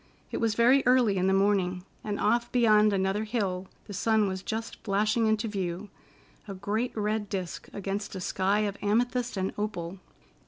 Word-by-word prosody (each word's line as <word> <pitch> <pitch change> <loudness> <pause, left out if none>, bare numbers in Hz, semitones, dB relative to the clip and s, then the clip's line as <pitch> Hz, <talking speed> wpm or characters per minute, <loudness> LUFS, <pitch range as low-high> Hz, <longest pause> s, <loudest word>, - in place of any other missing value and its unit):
It - - -2
was 225 -2 +1
very 250 +4 +5
early 245 -6 +4
in 185 +1 +2
the - - +3
morning, 190 -2 +1 0.2
and 210 -1 -3
off 240 0 +1
beyond 215 -3 +5
another 195 +2 0
hill 195 -5 -2 0.2
the 205 - -8
sun 215 +1 +2
was 190 -1 -3
just 225 +3 -4
flashing 210 +2 +1
into 220 +1 +1
view—a 195 +1 -7
great 215 +6 -2
red 210 0 -1
disc 185 -4 -4
against 200 +1 -4
a - - -4
sky 190 +3 +1
of 200 -1 -2
amethyst 240 +3 0
and 190 0 -1
opal. 190 -4 -4
205 Hz, 165 wpm, -28 LUFS, 190-220 Hz, 0.2 s, very